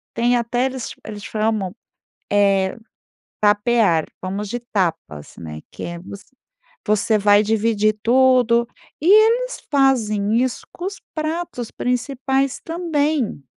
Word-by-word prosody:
tem 240 Hz, +1 st, +2 dB
até 240 Hz, +2 st, 0 dB
eles 260 Hz, -2 st, -4 dB
eles 210 Hz, -1 st, -8 dB
chamam, 215 Hz, -3 st, -1 dB, 0.6 s
eh, 195 Hz, -2 st, +2 dB, 0.6 s
tapear, 205 Hz, -5 st, +3 dB, 0.2 s
fomos 195 Hz, +2 st, -4 dB
de 240 Hz, +3 st, -3 dB, 0.2 s
tapas, 165 Hz, -, -2 dB
né, 75 Hz, -2 st, -8 dB
que -, -, -8 dB
é 170 Hz, 0 st, -5 dB
você 200 Hz, +2 st, -11 dB, 0.6 s
você 215 Hz, +1 st, +2 dB
vai 205 Hz, +1 st, +5 dB
dividir 215 Hz, -1 st, +1 dB
tudo 245 Hz, -1 st, +4 dB, 0.3 s
e 320 Hz, -, -3 dB
eles 455 Hz, +4 st, +4 dB
fazem 230 Hz, -5 st, +2 dB
isso 255 Hz, -2 st, -3 dB
com 355 Hz, -, -8 dB
os 395 Hz, 0 st, -6 dB
pratos 310 Hz, -6 st, -3 dB
principais 265 Hz, +2 st, -1 dB
também. 305 Hz, -, -1 dB
230 Hz, 120 wpm, -21 LUFS, 205-265 Hz, 0.6 s, vai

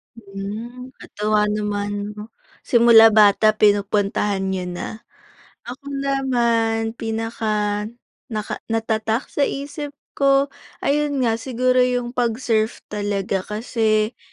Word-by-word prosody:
Hmm, 225 Hz, +5 st, -8 dB
katuwa 210 Hz, 0 st, 0 dB
naman 205 Hz, 0 st, -3 dB
no. 210 Hz, +1 st, -9 dB, 0.3 s
Simula 230 Hz, -2 st, +7 dB
bata 215 Hz, 0 st, +5 dB
pinupuntahan 205 Hz, -1 st, +1 dB
nyo 190 Hz, -1 st, -2 dB
na. 200 Hz, +5 st, -6 dB, 0.6 s
Ako 255 Hz, +3 st, -10 dB, 0.2 s
naman 235 Hz, -5 st, +1 dB
pinaka 220 Hz, -2 st, -2 dB, 0.4 s
naka 215 Hz, -4 st, -4 dB
natatak 225 Hz, +1 st, -1 dB
sa 280 Hz, -, +1 dB
isip 285 Hz, +1 st, -5 dB, 0.2 s
ko, 275 Hz, 0 st, +3 dB, 0.3 s
ayun 285 Hz, -1 st, +1 dB
nga 225 Hz, -2 st, +1 dB
siguro 255 Hz, +1 st, 0 dB
yung 245 Hz, -1 st, -1 dB
pag-surf 230 Hz, -2 st, -1 dB
talaga 205 Hz, -2 st, -1 dB
kasi, 215 Hz, 0 st, 0 dB
225 Hz, 100 wpm, -21 LUFS, 210-245 Hz, 0.6 s, Simula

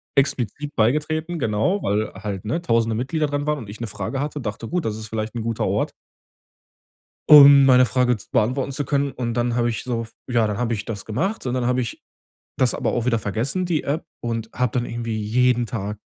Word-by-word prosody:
explizit 140 Hz, +1 st, 0 dB
beigetreten, 155 Hz, +8 st, 0 dB
genau, 115 Hz, -, 0 dB
weil 105 Hz, +2 st, 0 dB
halt, 100 Hz, 0 st, -6 dB
ne, 120 Hz, +11 st, -1 dB
1.000e 115 Hz, -6 st, +1 dB
Mitglieder 140 Hz, +6 st, -1 dB
dran 145 Hz, 0 st, -2 dB
waren 150 Hz, -1 st, 0 dB
und 110 Hz, -6 st, -9 dB
ich 105 Hz, -, -9 dB
'ne 115 Hz, -, -2 dB
Frage 135 Hz, +6 st, -4 dB
hatte, 145 Hz, +1 st, -3 dB
dachte: 110 Hz, 0 st, -5 dB
„Gut, 175 Hz, +3 st, -2 dB
das 110 Hz, -, -1 dB
ist 110 Hz, 0 st, -7 dB
vielleicht 110 Hz, +1 st, -4 dB
'n 115 Hz, -, -2 dB
guter 115 Hz, -1 st, -1 dB
Ort -, -, 0 dB, 1.4 s
um 140 Hz, -2 st, +10 dB
meine 130 Hz, -1 st, +6 dB
Frage 125 Hz, -1 st, +1 dB
z 100 Hz, -, -14 dB
beantworten 130 Hz, +3 st, 0 dB
zu 140 Hz, +1 st, -3 dB
können“, 140 Hz, 0 st, 0 dB
und 120 Hz, -2 st, -3 dB
dann 120 Hz, 0 st, 0 dB
habe 120 Hz, -1 st, +1 dB
ich 110 Hz, -, -4 dB
so 120 Hz, -2 st, -2 dB
f 115 Hz, -, -13 dB, 0.2 s
ja, 120 Hz, -3 st, +2 dB
dann 105 Hz, -2 st, -2 dB
habe 120 Hz, -1 st, 0 dB
ich 105 Hz, -, -6 dB
das 105 Hz, -4 st, -6 dB
gemacht, 185 Hz, -, -2 dB
und 125 Hz, -, -1 dB
dann 125 Hz, -1 st, -1 dB
habe 125 Hz, +1 st, +1 dB
ich 115 Hz, -, -6 dB, 0.6 s
das 130 Hz, -2 st, +2 dB
aber -, -, -1 dB
auch 120 Hz, -1 st, -1 dB
wieder 115 Hz, -3 st, +2 dB
vergessen, 120 Hz, -, -2 dB
die 170 Hz, -4 st, -1 dB
App, 150 Hz, +4 st, -2 dB, 0.2 s
und 115 Hz, -1 st, -3 dB
habe 125 Hz, -2 st, -1 dB
dann 120 Hz, -, 0 dB
irgendwie 115 Hz, -1 st, -4 dB
jeden 120 Hz, +3 st, +2 dB
Tag 105 Hz, -2 st, -4 dB
120 Hz, 220 wpm, -22 LUFS, 110-140 Hz, 1.4 s, um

